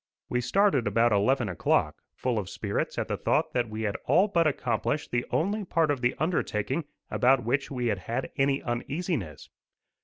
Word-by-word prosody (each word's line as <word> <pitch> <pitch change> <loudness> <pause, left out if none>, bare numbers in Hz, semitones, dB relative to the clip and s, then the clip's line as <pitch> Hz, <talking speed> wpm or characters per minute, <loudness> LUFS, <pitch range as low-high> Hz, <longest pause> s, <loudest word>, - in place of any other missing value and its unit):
We 125 - 0
started 135 - +2
about 115 +3 +3
eleven 110 +4 +2
o'clock, 90 - 0
full 125 -3 -1
of 95 - -5
spirits - - -3
at - - -1
the - - -2
thought - - 0
that 120 -2 0
we 110 +1 -4
had 105 -2 -1
all 175 +10 +4
but 170 -5 +2
accomplished 150 0 -1
the 120 0 -1
only 205 +6 0
part 165 -4 +1
of 140 -4 -2
the 125 0 +1
undertaking 150 - -1 0.3
about 130 0 +3
which 135 +5 0
we 125 -3 -3
had 105 -5 0
had 120 +7 -4
any 135 0 +1
uneasiness. 120 - -3
130 Hz, 180 wpm, -28 LUFS, 115-155 Hz, 0.3 s, all